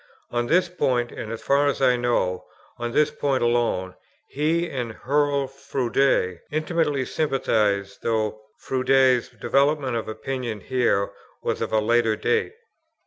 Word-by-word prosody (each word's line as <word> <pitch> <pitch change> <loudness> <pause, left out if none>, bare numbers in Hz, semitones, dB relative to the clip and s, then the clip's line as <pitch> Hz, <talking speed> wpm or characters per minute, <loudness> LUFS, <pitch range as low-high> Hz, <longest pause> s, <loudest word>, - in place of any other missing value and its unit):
On 120 0 -1
this 180 +5 +3
point, 130 -9 0
and, 110 - -6
as 115 - -6
far 140 +1 +3
as 140 - 0
I 130 -2 +4
know, 120 -7 0 0.3
on 120 0 -3
this 150 +3 +3
point 135 -3 0
alone, 120 -6 +1 0.3
he 160 +4 0
and 125 -6 -4
Hurrell 140 +2 +1
Froude 130 -8 0
intimately 155 -3 0
sympathized, 105 -10 0
though 110 -1 -1 0.2
Froude's 130 -1 +2
development 140 -2 +1
of 115 - -3
opinion 120 -1 -4
here 120 -5 +1 0.3
was - - -2
of - - -2
a 110 - +2
later 115 0 +2
date. 455 - 0
130 Hz, 140 wpm, -24 LUFS, 115-140 Hz, 0.3 s, I